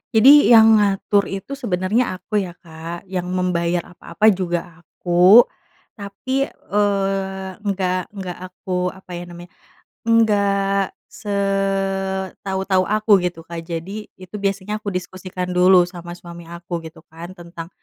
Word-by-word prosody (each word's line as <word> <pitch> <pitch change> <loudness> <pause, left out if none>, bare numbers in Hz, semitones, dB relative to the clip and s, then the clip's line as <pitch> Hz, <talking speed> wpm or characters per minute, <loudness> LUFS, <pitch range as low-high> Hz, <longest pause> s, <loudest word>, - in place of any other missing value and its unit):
Jadi 275 +6 +8
yang 225 -2 +7
ngatur 200 0 +1
itu 195 +7 -7
sebenarnya 210 -3 -1
aku 205 +3 -2
ya, 180 -3 -5
Kak, 165 0 -9
yang 180 -1 -2
membayar 180 -2 -1
apa-apa 215 +4 +2
juga 175 -2 -1 0.2
aku. 180 +6 +5 0.6
Tapi, 260 +7 -2
eee, 195 -1 -1
nggak 190 -3 -1 0.2
nggak 185 -3 -6
aku, 180 0 -3
apa 190 0 -9
ya 175 - -6
namanya, 175 0 -11 0.6
enggak 200 -3 +2 0.2
setau-tau 195 -1 -1
aku 210 -1 +4
gitu, 175 -2 -4
Kak. 170 0 -6
Jadi 185 +6 -5
itu 185 +2 -14
biasanya 200 +1 -2
aku 210 - -7
diskusikan 180 -1 -5
dulu 180 0 +6
sama 175 -1 -9
suami 170 -1 -11
aku 170 0 -6
gitu 160 0 -18
kan 170 +3 -10
tentang, 170 -1 -9
190 Hz, 130 wpm, -20 LUFS, 175-200 Hz, 0.6 s, Jadi